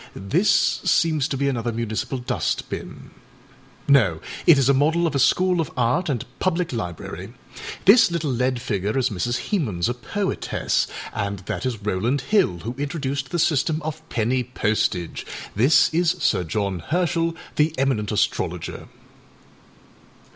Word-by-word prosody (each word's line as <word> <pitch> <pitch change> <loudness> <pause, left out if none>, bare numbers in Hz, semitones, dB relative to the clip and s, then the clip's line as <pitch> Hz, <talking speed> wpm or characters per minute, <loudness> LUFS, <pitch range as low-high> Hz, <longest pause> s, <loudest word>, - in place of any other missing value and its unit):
This 185 - +2
seems 155 -4 +2
to 140 - -3
be 140 +1 0
another 120 -3 -1
municipal 115 +3 -3
dust 125 - -2
binâno, 110 - -2 0.3
it 165 - +8
is 135 -2 +3
a 140 - +5
model 160 +5 +2
of 160 - 0
a 140 - +1
school 180 +6 +3
of 155 - -3
art 125 +9 +1
and 125 -6 -2
public 180 -4 0
library. 90 -8 -6 0.5
This 205 +3 +7
little 165 -4 -1
lead 125 0 0
figure 105 0 -2
is 130 -2 +1
Mrs. 120 - -2
Hemans, 110 - 0
a 120 - 0
poetess, 185 - -1 0.3
and 100 0 -2
this 130 - -3
is 115 -5 -4
Rowland 115 +8 0
Hill, 155 - +1
who 115 +3 -4
introduced 140 -2 -3
the 175 - -2
system 155 -1 +2
of 155 0 -4
penny 125 +3 0
postage. 105 -7 -1 0.3
This 135 +9 +4
is 170 +1 +3
Sir 155 - +1
John 100 +1 -2
Herschel, 165 - 0 0.2
the 155 +1 +3
eminent 130 -6 0
astrologer. 105 - -2
135 Hz, 145 wpm, -23 LUFS, 110-160 Hz, 0.5 s, it